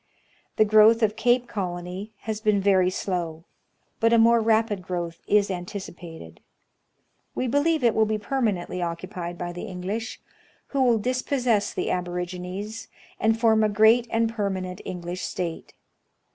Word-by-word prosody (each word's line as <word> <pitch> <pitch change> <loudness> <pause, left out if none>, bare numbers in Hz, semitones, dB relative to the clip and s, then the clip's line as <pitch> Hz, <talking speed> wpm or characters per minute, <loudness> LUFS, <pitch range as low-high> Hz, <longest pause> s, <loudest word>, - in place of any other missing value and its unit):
The 215 - +4
growth 215 +2 +6
of 210 0 +2
Cape 240 +2 +2
Colony 180 +1 -5
has 220 -1 -4
been 210 -2 +2
very 190 -2 +3
slow, 170 -4 -3 0.6
but 230 0 +3
a 235 - +5
more 230 +1 +5
rapid 220 -2 +1
growth 175 -2 -5
is 205 -1 +3
anticipated. 175 - -8 1.0
We - - -1
believe 285 +4 +1
it 235 - +4
will 220 0 +3
be 215 0 0
permanently 210 -6 -2
occupied 175 +1 -5
by 175 0 -4
the 175 - -6
English, 200 +3 -5 0.5
who 275 - 0
will 245 -3 +4
disposses 250 -2 0
the - - -1
aborigines, 180 +4 -4 0.3
and 225 0 +2
foi 230 -1 +4
m 220 0 +3
a 215 - +3
great 220 +3 +4
and 225 0 +1
permanent 190 -5 -3
English 180 0 -5
State. 170 -2 -5
205 Hz, 145 wpm, -25 LUFS, 180-225 Hz, 1.0 s, growth